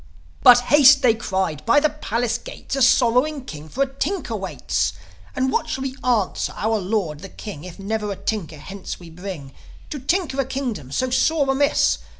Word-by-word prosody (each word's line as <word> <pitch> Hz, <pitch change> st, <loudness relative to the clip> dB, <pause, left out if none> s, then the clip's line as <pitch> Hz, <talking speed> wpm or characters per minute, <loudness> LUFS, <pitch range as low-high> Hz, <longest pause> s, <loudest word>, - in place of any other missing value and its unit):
"But 245 Hz, 0 st, +8 dB
haste!" 280 Hz, +1 st, +6 dB
they 240 Hz, -3 st, +6 dB
cried. 190 Hz, -8 st, -2 dB
"By 235 Hz, +5 st, +4 dB
the 305 Hz, +1 st, +1 dB
palace 240 Hz, -5 st, -2 dB
gates -, -, -7 dB
A 270 Hz, -, -1 dB
sorrowing 250 Hz, +3 st, +3 dB
king 155 Hz, -, -9 dB
for 270 Hz, -, 0 dB
a -, -, 0 dB
tinker 380 Hz, +8 st, -2 dB
waits. -, -, -2 dB, 0.4 s
And 260 Hz, 0 st, 0 dB
what -, -, -1 dB
shall 265 Hz, -, -3 dB
we 265 Hz, -1 st, -4 dB
answer 230 Hz, -7 st, 0 dB
our 220 Hz, 0 st, 0 dB
Lord 185 Hz, -6 st, -2 dB
the 195 Hz, +4 st, -9 dB
King 180 Hz, -7 st, -9 dB
If 180 Hz, -2 st, -10 dB
never 210 Hz, +1 st, -3 dB
a -, -, -3 dB
tinker 180 Hz, -7 st, -4 dB
hence 190 Hz, +6 st, -8 dB
we 170 Hz, -2 st, -12 dB
bring, 165 Hz, -6 st, -8 dB, 0.4 s
To 295 Hz, -, -4 dB
tinker 295 Hz, -1 st, 0 dB
a -, -, -3 dB
kingdom 240 Hz, -, -4 dB
so 255 Hz, -, -1 dB
sore 295 Hz, +2 st, +2 dB
amiss?" 285 Hz, +2 st, +2 dB
230 Hz, 185 wpm, -22 LUFS, 190-270 Hz, 0.4 s, But